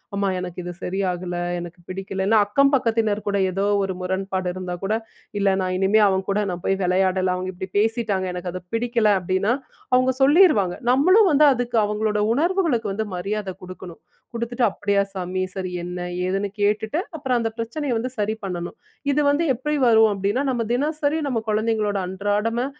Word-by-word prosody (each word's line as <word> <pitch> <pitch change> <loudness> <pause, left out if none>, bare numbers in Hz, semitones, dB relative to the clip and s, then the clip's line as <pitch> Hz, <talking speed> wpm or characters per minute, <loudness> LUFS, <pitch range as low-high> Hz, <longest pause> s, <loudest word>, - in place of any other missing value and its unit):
அம்மா 200 0 0
எனக்கு 180 -1 -6
இது 175 0 -5
சரியாகல. 180 -2 -2 0.2
எனக்கு 175 +1 -9
பிடிக்கலன்னா 195 +3 0
அக்கம் 275 +6 +3
பக்கத்தினர் 225 -4 0
கூட 200 - 0
ஏதோ 195 +2 -1 0.2
ஒரு 190 -1 -2
முரண்பாடு 190 0 -2
இருந்தா 180 -1 -5
கூட, 205 +3 0 0.4
இல்ல 200 -1 +2
நான் 185 0 -1
இனிமே 195 +3 +3
அவன் 190 0 -1
கூட 200 - +1
நான் 175 -1 -6
போய் 195 - +1
விளையாடல. 185 +1 +2
அவுங்க 185 +1 -4
இப்பிடி 185 +1 -7
பேசிட்டாங்க. 220 -4 0
எனக்கு 180 0 -4
அது 185 - -4
பிடிக்கல 230 -2 +1
அப்பிடின்னா, 190 +5 0 0.4
அவுங்க 255 +1 +4
சொல்லிருவாங்க. 270 - +5 0.2
நம்மளும் 370 - +5
வந்து 300 +1 +5
அதுக்கு 240 -1 -2
அவுங்களோட 210 0 -1
உணர்வுகளுக்கு 300 - +1
வந்து 220 +2 -2
மரியாதை 200 +2 -3
கொடுக்கணும். 180 -2 -10 0.3
கொடுத்துட்டு 235 +1 -2
அப்பிடியா 200 -1 +1
சாமி! 185 0 -2
சரி. 185 -1 -4
என்ன 180 +1 -5 0.3
ஏதுன்னு 195 +2 -1
கேட்டுட்டு 215 +8 +1 0.2
அப்பறம் 260 -5 0
அந்த 225 - 0
பிரச்சனைய 240 +4 -3
வந்து 250 +3 -3
சரி 210 +1 0
பண்ணணும். 175 -2 -4 0.4
இது 295 +2 +2
வந்து 290 +4 +2
எப்பிடி 295 +5 -2
வரும்? 220 -1 +6
அப்பிடின்னா 200 +7 -1
நம்ம 235 -2 -1
தினசரி 300 +3 0
நம்ம 235 -4 -1
குழந்தைங்களோட 215 -1 0
அன்றாடமா 205 +5 -1
205 Hz, 165 wpm, -23 LUFS, 185-240 Hz, 0.4 s, வரும்